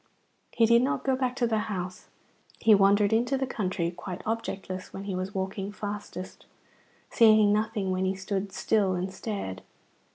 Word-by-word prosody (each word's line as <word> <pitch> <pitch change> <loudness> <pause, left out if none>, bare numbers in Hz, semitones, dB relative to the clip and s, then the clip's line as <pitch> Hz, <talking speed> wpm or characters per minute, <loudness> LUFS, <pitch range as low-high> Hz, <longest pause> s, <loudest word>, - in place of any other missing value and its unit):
He 230 - +3
did 235 +1 +5
not 265 - 0
go 265 -1 +2
back 255 -1 -1
to 245 - +1
the 225 -2 +1
house. 185 -2 -5 0.5
He 220 - +6
wandered 200 +1 +4
into 245 +4 +2
the 265 - -1
country, 185 -8 -2
quite 180 +1 -7
objectless 195 -4 -4
when 195 - -7
he 200 -1 -4
was 185 +2 -4
walking 195 +1 -3
fastest, 205 -3 -7 0.6
seeing 215 -3 +6
nothing 215 -2 0
when 185 0 0
he 190 +1 0
stood 195 0 -3
still 195 -1 +1
and 185 +1 -3
stared. 190 - -5
205 Hz, 165 wpm, -28 LUFS, 190-220 Hz, 0.6 s, He